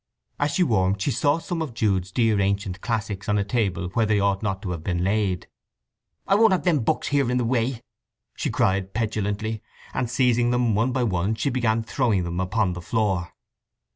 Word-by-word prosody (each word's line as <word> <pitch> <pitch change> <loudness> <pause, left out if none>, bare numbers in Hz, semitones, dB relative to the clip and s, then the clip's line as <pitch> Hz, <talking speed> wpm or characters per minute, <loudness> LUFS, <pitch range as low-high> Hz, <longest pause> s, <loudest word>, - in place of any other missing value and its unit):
As 145 - +2
she 180 - +4
warmed 100 - +1
she 105 - 0
saw 145 +4 +2
some 165 0 -4
of 140 -7 -4
Jude's 95 -5 0
dear 110 -1 +2
ancient 100 -1 -1
classics 105 -3 -3
on 105 - +2
a 100 - +2
table 95 -4 -1
where 110 +4 +1
they 105 -1 +2
ought 100 -1 +1
not 100 -3 -2
to 95 - -3
have 85 -3 -5
been 90 -1 -1
laid. 95 -2 0 0.8
"I - - +2
won't 215 0 +5
have 185 - 0
them 170 -5 +3
books 135 +6 0
here 140 -4 +2
in 125 - +1
the 125 - +1
way!" 120 0 0 0.5
she - - -2
cried 95 0 0
petulantly; 110 -1 -2 0.3
and 125 -2 -1
seizing 125 -1 +2
them 120 -2 +2
one 115 +5 +1
by 125 0 0
one 100 0 0
she 110 +6 -1
began 115 -3 +1
throwing 110 -5 +1
them 85 +1 -3
upon 95 +1 0
the 90 - -7
floor. 95 -3 -1
110 Hz, 200 wpm, -24 LUFS, 95-125 Hz, 0.8 s, won't